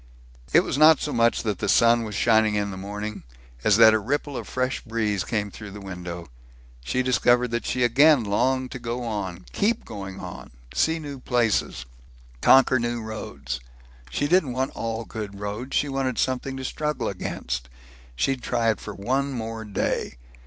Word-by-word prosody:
It - - +6
was 140 - -2
not 155 0 +8
so 150 - -3
much 115 0 +2
that 105 -5 -2
the - - -1
sun 115 0 +5
was 105 -2 -5
shining, 110 -2 +3
in 100 -1 -1
the - - -6
morning, 105 +2 -5 0.4
as 105 - +4
that 110 -1 +8
a 110 - +3
ripple 140 +5 -2
of - - -5
fresh 130 0 -1
breeze 110 -4 -1
came 105 -3 -2
through 105 0 -9
the 105 +1 -9
window. 90 -3 -7 0.6
She 125 - 0
discovered 125 -1 +3
that 120 0 -2
she 125 0 0
again 135 +3 +5
longed 130 +5 0
to 125 - -6
go 120 +1 -4
on 95 -6 -4
keep 225 +3 0
going 95 -3 -7
on - - -8 0.2
see 160 - +2
new 145 -4 -7
places, 120 - 0 0.6
conquer 130 -1 +6
new 120 0 -1
roads. 70 - -5 0.5
She 145 - -1
didn't 155 -6 +3
want 130 +2 -1
all 115 0 -3
good 105 -3 -6
road. 105 +6 -5
She 145 - +1
wanted 135 -3 -1
something 130 +1 -1
to 130 - -5
struggle 150 +3 -2
against. - - -4 0.5
She'd 130 - 0
try 115 -2 +1
it - - -4
for 105 - -7
one 135 +7 -1
more 115 -2 -4
day. 100 - -2
115 Hz, 180 wpm, -25 LUFS, 105-130 Hz, 0.6 s, not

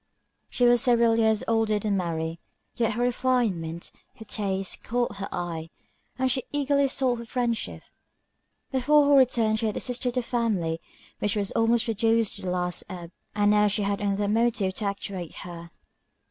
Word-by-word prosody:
She 245 - +1
was 240 0 +5
several 235 -3 +3
years 220 -1 +3
older 225 -2 +2
than 205 -1 -1
Mary, 165 -2 -2 0.4
yet 230 -2 +1
her 240 +3 -1
refinement, 230 -10 0 0.2
her 220 - -11
taste, 195 -3 -3
caught 240 -3 -1
her 195 - -5
eye, 165 -2 -4 0.5
and 260 0 +1
she 260 +1 +1
eagerly 280 -1 +2
sought 260 -3 0
her 235 - -7
friendship: 240 -2 -2 0.9
before 290 +3 +4
her - - +5
return 235 -5 +4
she 220 - 0
had 215 - -2
assisted 250 0 -2
the 250 - 0
family, 205 -10 -1 0.4
which 210 0 +1
was 200 -2 -1
almost 230 +1 +2
reduced 225 0 +1
to - - -10
the 185 - -3
last 180 -1 -1
ebb; 175 -2 -8 0.2
and 205 0 +3
now 210 0 +4
she 205 +1 +1
had 200 0 -1
another 200 0 0
motive 220 -3 +1
to 210 - -4
actuate 195 -3 -4
her. 170 -1 -8
220 Hz, 170 wpm, -26 LUFS, 195-240 Hz, 0.9 s, was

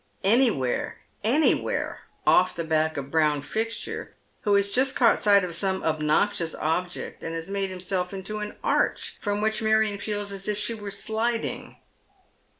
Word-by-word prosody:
Any 235 +6 +5
where, 130 - -2 0.3
anywhere, 270 +9 +2 0.3
off 185 0 +4
the 170 - -2
back 160 -1 +1
of 140 0 -5
Brown 150 -3 +2
Fixture, 225 +7 -3 0.3
who 205 -2 +2
has 200 0 +2
just 260 +4 +2
caught 235 - +4
sight 200 -2 +5
of 180 -2 -3
some 190 +2 -1
obnoxious 160 +3 +1
object, 175 +3 -3
and 165 - -4
has 165 +3 -5
made 195 -1 -1
himself 180 0 -3
into 195 +2 -5
an 210 0 -5
arch - - 0
from 205 0 -1
which 220 0 0
Marion 220 -2 +2
feels 205 -1 -3
as 195 0 -5
if 210 -1 0
she 210 +2 0
were 205 -2 -6
sliding. 225 +3 -2
200 Hz, 160 wpm, -26 LUFS, 170-215 Hz, 0.3 s, Any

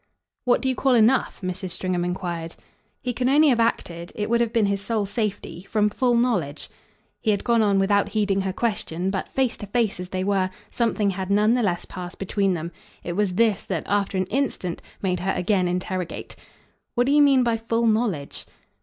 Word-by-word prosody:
"What 245 +2 +3
do - - +1
you 260 - +2
call 260 0 +2
enough?" 235 +3 +3
Mrs. 185 +1 -3
Stringham 180 0 -2
enquired. 175 -2 -4 0.5
"He 250 - -1
can 250 +2 0
only 295 +2 +5
have 245 -3 +3
acted 170 -7 -1
it 210 +1 -3
would 235 0 +3
have 235 -2 +1
been 230 -3 +2
his 200 0 0
sole 215 0 -1
safety 205 -4 -3
from 210 -1 +2
full 245 +2 +2
knowledge." 185 - 0 0.5
He 220 - -1
had 205 -2 +1
gone 235 -1 +3
on 200 -2 +3
without 200 +1 +2
heeding 205 -2 +1
her 190 0 -1
question; 190 -4 -1
but, 190 - -3
face 260 -3 0
to 205 - -7
face 220 -2 0
as 180 0 -6
they 185 -1 -2
were, 195 -1 +1 0.2
something 220 -4 +1
had 190 0 -4
none 210 +3 +4
the 245 - +2
less 180 -6 0
passed 180 0 -8
between 195 -1 0
them. 170 +1 -5 0.3
It 175 - -3
was 195 -1 0
this 220 -2 +3
that, 175 -5 -2
after 200 -1 0
an 185 - +1
instant, 230 -9 -1 0.2
made 180 -2 0
her 185 +2 0
again 185 0 +1
interrogative. 180 0 -3 0.6
"What 245 - +3
do 275 - +1
you 295 +1 +6
mean 275 -3 +5
by 235 -1 +1
full 230 +1 0
knowledge?" 215 -10 0
205 Hz, 205 wpm, -24 LUFS, 185-235 Hz, 0.6 s, you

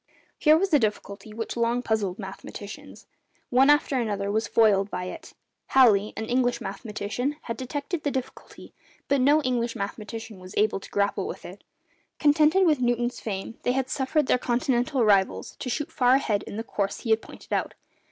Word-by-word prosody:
Here 310 0 +6
was 380 0 -1
a 295 - +7
difficulty 210 -2 -3
which 225 +1 -5
long 235 +1 0
puzzled 205 -5 -1
mathematicians. 200 +1 -9 0.5
One 260 +3 +5
after 295 -2 +3
another 200 -3 -1
was 220 +2 0
foiled 205 -3 +3
by 180 -2 -4
it. 320 - -8 0.3
Halley, 215 -6 +5
an 220 - -3
English 245 +1 +1
mathematician, 210 +6 -4
had 230 - -4
detected 285 +6 -4
the 290 - 0
difficulty, 265 -2 -7 0.3
but 280 -2 +2
no 295 +4 +4
English 240 -2 -1
mathematician 215 +1 -6
was 185 +1 -11
able 210 -1 +2
to - - -12
grapple 200 0 0
with - - -7
it. - - -11 0.5
Contented 305 +5 +4
with 305 -6 +3
Newton's 240 0 0
fame, 205 +1 -5
they 250 - +1
had 265 0 -1
suffered 295 +2 +1
their 250 - +2
Continental 250 +1 +1
rivals 195 -2 +2
to 255 - -5
shoot 295 +4 -3
far 250 0 +4
ahead 215 -7 +1
in 205 - -6
the 225 - -3
course 200 -3 -3
he 230 - -2
had 220 0 +3
pointed - - -10
out. - - -1
235 Hz, 180 wpm, -26 LUFS, 210-265 Hz, 0.5 s, a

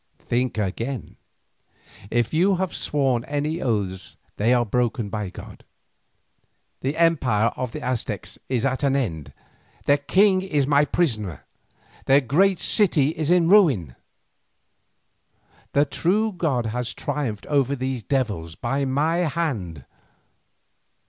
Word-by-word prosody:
Think 125 0 -1
again. 115 +5 -4 0.9
If 120 +3 0
you 185 +5 +3
have 185 0 -2
sworn 135 -5 0
any 150 +3 -2
oaths 100 -6 -2 0.2
they 110 +4 +2
are 120 -1 +3
broken 120 -1 -1
by 105 -2 -3
God. - - -12 1.2
The 135 +4 -3
empire 130 -10 +2
of 125 -2 -4
the - - -7
Aztecs 125 -2 -3
is 125 -2 0
at 130 -1 -1
an 140 -1 +2
end, 85 - -2 0.5
their 145 0 +3
king 190 +6 +3
is 150 -8 0
my 145 +1 +3
prisoner, 110 - -1 0.6
their 135 +1 +6
great 175 +9 +2
city 165 -7 +4
is 155 -1 -3
a 180 0 +5
ruin. 165 - +4 1.8
The 145 +1 +4
true 205 +9 0
God 150 - -1
has 120 +2 -3
triumphed 115 -9 -3
over 140 -2 +1
these 130 -1 -3
devils 105 - -2
by 135 +6 -2
my 150 +5 +1
hand. 135 - -2
135 Hz, 125 wpm, -23 LUFS, 115-155 Hz, 1.8 s, their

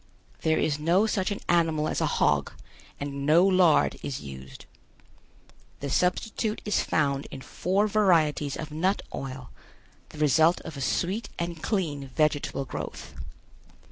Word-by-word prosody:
There 160 -1 +2
is 150 -1 0
no 175 +7 +3
such 200 -4 0
an 205 - -4
animal 160 -3 +2
as - - -2
a - - +2
hog 70 0 +1 0.5
and 140 -1 -4
no 160 +5 +5
lard 185 -4 +4
is 135 - -4
used. 65 -2 -10 1.1
The 140 -1 -4
substitute 210 - 0
is 210 - +1
found 140 -2 0
in 135 - -8
four 195 +9 0
varieties 165 -9 +2
of 155 -1 -6
nut 180 +6 0
oil, 130 -2 -6 0.6
the - - -13
result 155 +3 +4
of 155 - -8
a 140 - -6
sweet 185 - -1
and 170 -2 -4
clean 150 -10 -2
vegetable 145 -3 0
growth. - - -7
155 Hz, 140 wpm, -27 LUFS, 140-185 Hz, 1.1 s, no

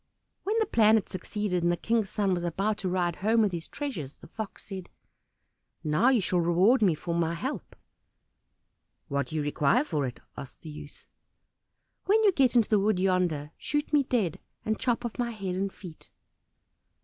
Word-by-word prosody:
When 425 +3 0
the 445 - +3
plan 220 - +5
had 220 - 0
succeeded, 185 0 -2
and 175 +1 +2
the 175 - 0
King's 225 +1 0
son 200 -3 0
was 175 -1 -2
about 195 +5 -1
to 190 - -2
ride 175 -2 0
home 220 +4 +2
with 205 - +1
his 170 -2 -5
treasures, 190 - -5
the - - -15
Fox 220 -3 -7
said, 190 -3 -7 0.9
"Now 155 +11 +3
you 250 -5 +3
shall 180 -1 +1
reward 180 +9 +4
me 185 -6 +4
for 170 +3 -4
my 170 0 0
help." 265 - -5 1.3
"What 140 -2 -1
do 155 - -7
you 155 - 0
require 150 - +2
for 150 - -1
it?" 125 - -8 0.2
asked 135 - -10
the 155 - -8
youth. 150 -1 -11 1.0
"When 435 +3 +4
you 410 - +6
get 270 -7 +2
into 230 -3 +5
the 215 - +4
wood 205 0 +2
yonder, 180 -6 +1
shoot 295 +1 -2
me 295 - +6
dead, 230 - -1 0.3
and 220 0 -1
chop 240 -1 0
off 235 +1 -5
my 240 -1 0
head 195 -5 -4
and 195 +1 -1
feet." 175 -6 -12
195 Hz, 190 wpm, -28 LUFS, 170-230 Hz, 1.3 s, you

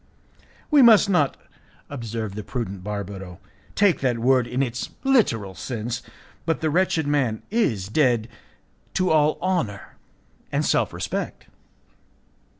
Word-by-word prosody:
"We 295 -2 +7
must 220 -4 +7
not," 150 -7 +2 0.5
observed 115 -6 -5
the 105 - -5
prudent 100 -6 -5
Barbaro, 95 -3 -6 0.4
"take 200 -5 +3
that 125 -3 0
word 125 +1 +3
in 130 +3 0
its 125 -1 -4
literal 125 - +2
sense, 115 +3 -4 0.4
but 165 - 0
the 155 -1 0
wretched 170 -2 +1
man 135 -7 0
is 115 - +1
dead 120 -2 +2 0.7
to 185 -1 +2
all 155 -1 +3
honour 170 - -2 0.5
and - - 0
self - - +2
respect." - - -4
125 Hz, 125 wpm, -24 LUFS, 110-160 Hz, 0.7 s, We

